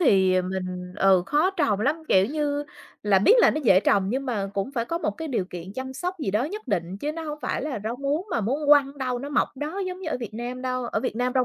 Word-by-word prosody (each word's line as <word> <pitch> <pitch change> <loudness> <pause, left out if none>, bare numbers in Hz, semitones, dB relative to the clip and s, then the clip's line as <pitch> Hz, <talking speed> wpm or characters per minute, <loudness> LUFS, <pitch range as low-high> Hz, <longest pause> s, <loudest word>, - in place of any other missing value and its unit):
thì 190 - +4
mình 180 -1 -4
ừ, 190 -3 +4
khó 300 - +3
trồng 290 - 0
lắm, 290 +7 +2
kiểu 190 0 +5
như, 290 +1 -1 0.4
là 205 -2 +4
biết 210 - +6
là 485 - +6
nó 305 - -2
dễ 190 -4 +6
trồng 195 -1 +2
nhưng 265 +5 -2
mà 210 -6 -1
cũng 200 +6 -2
phải 235 -4 -1
có 335 +6 -2
một 315 - -1
cái 320 -2 -6
điều 235 -8 0
kiện 180 +1 -8
chăm 260 +1 -5
sóc 360 +7 -3
gì 250 -11 -2
đó 210 +5 +1
nhất 415 +5 -6
định, 185 -3 -1
chứ 300 +5 -2
nó 330 - -6
hông 300 -1 -5
phải - - -2
là 280 -8 -3
rau 230 +2 -2
muống 285 +7 -1
mà 235 - 0
muốn 270 +8 -1
quăng 290 -1 +7
ở 275 - -10
đâu 255 -2 -1
nó 280 +3 -6
mọc 290 - +1
ở - - -27
đó 305 +8 -4
giống 365 0 -5
như 360 - -4
ở - - 0
Việt 215 -2 -6
Nam 245 +2 -5
đâu, 255 -1 -2
ở - - -1
Việt 250 -4 -3
Nam 250 +1 0
rau 255 - +3
255 Hz, 290 wpm, -25 LUFS, 200-295 Hz, 0.4 s, quăng